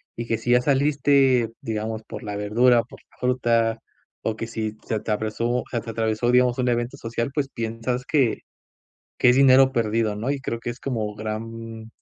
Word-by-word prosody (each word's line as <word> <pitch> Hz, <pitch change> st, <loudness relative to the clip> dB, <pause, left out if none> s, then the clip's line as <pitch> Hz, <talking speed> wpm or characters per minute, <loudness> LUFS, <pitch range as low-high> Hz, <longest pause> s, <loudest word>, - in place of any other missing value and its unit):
y 120 Hz, -, -4 dB
que 115 Hz, -1 st, -1 dB
si 120 Hz, -, -5 dB
ya 125 Hz, 0 st, +5 dB
saliste, 135 Hz, -3 st, +3 dB
digamos, 110 Hz, 0 st, -3 dB
por -, -, -9 dB
la 105 Hz, -1 st, -5 dB
verdura 120 Hz, +4 st, +3 dB
o 115 Hz, -, -1 dB
por -, -, -14 dB
la -, -, -25 dB
fruta 115 Hz, -3 st, +1 dB, 0.4 s
o 110 Hz, -, -1 dB
que 115 Hz, -, -5 dB
si 110 Hz, -1 st, -4 dB
se 110 Hz, -, -2 dB
atravesó 110 Hz, +3 st, -1 dB
se 120 Hz, -, -1 dB
te 115 Hz, -, -6 dB
atravesó, 115 Hz, +1 st, 0 dB
digamos 125 Hz, -1 st, +3 dB
un 125 Hz, -1 st, +1 dB
evento 120 Hz, +3 st, -1 dB
social, 115 Hz, -1 st, -3 dB
pues 140 Hz, -2 st, -1 dB
piensas 115 Hz, +2 st, -3 dB
que 135 Hz, -5 st, +1 dB, 0.8 s
que 125 Hz, -, +5 dB
es 125 Hz, -, +3 dB
dinero 135 Hz, 0 st, +6 dB
perdido, 115 Hz, -3 st, 0 dB
¿no? 115 Hz, +6 st, -2 dB
Y 140 Hz, -1 st, -2 dB
creo 115 Hz, -3 st, -3 dB
que 120 Hz, -, -6 dB
es 120 Hz, -, -8 dB
como 110 Hz, -6 st, -3 dB
gran 110 Hz, +1 st, -6 dB
115 Hz, 195 wpm, -24 LUFS, 110-125 Hz, 0.8 s, dinero